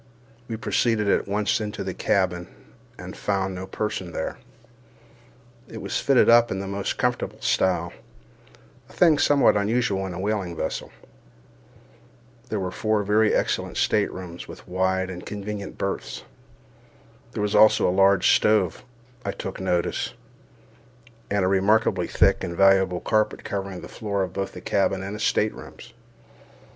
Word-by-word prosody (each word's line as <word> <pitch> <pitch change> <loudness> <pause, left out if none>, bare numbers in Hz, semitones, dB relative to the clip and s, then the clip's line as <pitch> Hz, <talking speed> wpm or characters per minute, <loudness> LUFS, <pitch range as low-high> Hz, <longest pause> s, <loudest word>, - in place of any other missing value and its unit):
We 115 - -4
proceeded 115 -1 +1
at 100 - +2
once 105 +3 0
into 105 -2 -4
the 95 -1 -4
cabin, 90 -3 0 0.5
and - - -8
found 95 -2 -1
no 95 +1 -6
person 95 -5 -4
there. 80 - -4 1.3
It - - -8
was - - -2
fitted 135 -3 +4
up 120 0 +6
in 95 - -2
the 100 - -4
most 100 0 -3
comfortable - - -1
style—a 95 -1 +1 1.0
thing 160 -5 +4
somewhat 145 -6 +4
unusual 100 -2 0
in 90 - -6
a - - -6
whaling 100 -3 -2
vessel. - - -4 1.6
There 105 - -2
were 90 -1 -3
four 110 +2 0
very 105 +2 +3
excellent - - -1
staterooms, 90 -2 -1
with - - -12
wide 95 +1 0
and 90 -1 -8
convenient 105 -1 -6
berths. 100 - -4 1.1
There 105 - -2
was 105 - -1
also 110 - +5
a 90 - +1
large 95 +1 +4
stove, 105 -6 +2 0.4
I - - -2
took 95 - -6
notice, 90 -2 -1 1.1
and 100 -2 +1
a - - +2
remarkably 95 -1 +2
thick 95 +3 +2
and 85 0 -4
valuable 95 -2 +4
carpet 110 0 0
covering 95 -2 -4
the - - -9
floor 100 -3 -2
of 90 -1 -5
both 95 0 -3
the 90 - -9
cabin 95 0 0
and 105 +2 -5
staterooms. 110 0 -2
100 Hz, 145 wpm, -24 LUFS, 95-105 Hz, 1.6 s, up